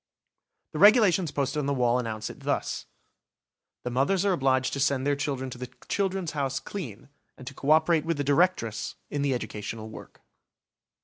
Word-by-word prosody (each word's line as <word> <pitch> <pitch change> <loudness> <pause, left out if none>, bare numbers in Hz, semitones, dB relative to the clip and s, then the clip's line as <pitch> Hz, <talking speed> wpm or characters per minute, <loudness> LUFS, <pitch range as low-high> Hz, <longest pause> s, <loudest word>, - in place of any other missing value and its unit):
6 - - -63
The - - -5
Regulations 205 -6 +6
posted 140 0 -1
on 145 - -1
the 140 - +1
walls 125 -1 +2
announce 110 -2 -4
it - - -14
thus: - - -2 1.0
"The 125 - -3
mothers 155 +10 +1
are 195 - +3
obliged 130 -4 +1
to 140 - -2
send 135 -1 +1
their 145 0 +2
children 135 -2 -3
to 120 - -8
the 125 -1 -6 0.2
'Children's 190 -4 -1
House' 135 -3 -1
clean, 135 - -7 0.3
and 130 - -11
to 140 - -7
co 135 +2 -4
operate 160 0 +4
with 165 -1 -1
the 145 - 0
Directress 145 - +1 0.2
in 145 - -1
the 140 -2 +1
educational 110 -1 -5
work." - - -12
140 Hz, 185 wpm, -27 LUFS, 125-165 Hz, 1.0 s, Regulations